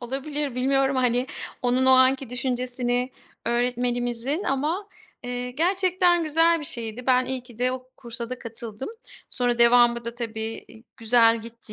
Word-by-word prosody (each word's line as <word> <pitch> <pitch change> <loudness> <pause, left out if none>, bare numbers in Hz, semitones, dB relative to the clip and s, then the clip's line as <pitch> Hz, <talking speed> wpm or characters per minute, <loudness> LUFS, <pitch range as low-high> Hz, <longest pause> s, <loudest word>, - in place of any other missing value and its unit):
olabilir, 275 +2 -4
bilmiyorum, 270 +1 +1
hani, 250 0 +1 0.4
onun 250 +1 +2
o - - +6
anki 260 0 +4
düşüncesini 250 0 -1 0.4
öğretmenimizin 245 - -1
ama, 310 +9 -1 0.3
eee, 245 0 -4
gerçekten 355 +3 +2
güzel 330 +2 +3
bir - - -6
şeydi. 235 -2 -4
Ben 255 -1 +4
iyi 260 -1 -4
ki 240 -3 -16
de 250 +1 +1
o 255 0 -7
kursa 235 -1 -7
da 255 - -4
katıldım. 230 +1 -7 0.4
Sonra 245 -1 0
devamı 235 0 +5
da 235 0 -5
tabii, 225 -2 -5
i 225 - -15
güzel 230 0 +4
gitti 230 -1 -11
250 Hz, 150 wpm, -25 LUFS, 235-270 Hz, 0.4 s, o